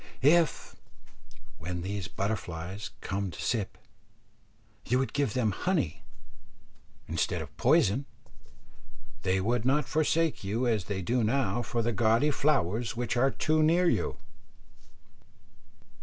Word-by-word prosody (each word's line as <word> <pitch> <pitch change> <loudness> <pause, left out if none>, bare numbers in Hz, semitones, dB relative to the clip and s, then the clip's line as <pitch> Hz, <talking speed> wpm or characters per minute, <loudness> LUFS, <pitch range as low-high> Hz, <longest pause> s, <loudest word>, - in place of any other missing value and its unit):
If, 160 +3 +3 0.8
when 85 +1 -4
these 100 -1 -3
butterflies 95 -1 -4
come 100 0 -2
to - - -10
sip, 110 -5 -1 1.1
you 125 - +1
would 130 0 -1
give 140 -7 0
them 115 -4 +2
honey 165 - -1 1.1
instead - - -1
of - - -8
poison, 120 +9 +3 1.2
they 95 +1 +1
would 115 +4 0
not 135 +3 +2
forsake 155 0 +1
you 110 +6 -1
as 110 -6 +1
they 95 -2 -3
do 120 +5 +1
now 120 +1 +1
for 120 0 -2
the 120 +1 0
gaudy 115 +6 +3
flowers 120 - +1
which 120 -1 -1
are 130 +3 +4
too 155 +3 +1
near 170 +3 +4
you. - - 0
120 Hz, 125 wpm, -29 LUFS, 100-140 Hz, 1.2 s, are